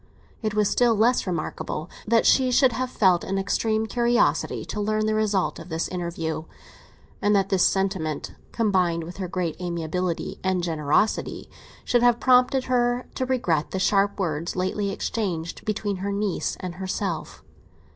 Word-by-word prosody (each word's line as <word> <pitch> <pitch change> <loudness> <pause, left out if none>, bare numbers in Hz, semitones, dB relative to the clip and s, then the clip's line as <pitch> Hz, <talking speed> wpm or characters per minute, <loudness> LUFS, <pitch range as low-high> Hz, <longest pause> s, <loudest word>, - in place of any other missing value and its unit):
It 215 -2 -2
was 210 -1 +3
still 240 +1 +3
less 230 +1 +2
remarkable 155 -2 -3 0.2
that 230 +1 +3
she 260 -1 +4
should 255 +1 +4
have 255 +2 -2
felt 185 -7 +3
an 195 - -2
extreme 215 +3 0
curiosity 240 +1 +1
to 210 - -4
learn 215 +1 0
the 215 - +1
result 210 -3 0
of - - -10
this 160 0 -2
interview, 165 -3 -4 0.8
and 205 0 +3
that 195 -1 +2
this 190 -2 +3
sentiment, 190 -6 -1 0.2
combined 185 -7 +1
with 175 +2 -9
her 190 -2 -3
great 180 -1 -3
amiability 170 0 -3
and 185 -2 0
generosity, 160 +4 0 0.3
should 240 - +3
have 240 -1 +4
prompted 255 +1 +4
her 245 -1 +1
to 260 - -2
regret 175 - 0
the - - -3
sharp 200 +1 +2
words 165 -3 -2
lately 190 +2 -1
exchanged 185 -5 -3
between 210 -2 -2
her 200 +2 -3
niece 200 -1 -1
and 180 -1 -5
herself. 185 -1 -3
195 Hz, 155 wpm, -25 LUFS, 175-225 Hz, 0.8 s, she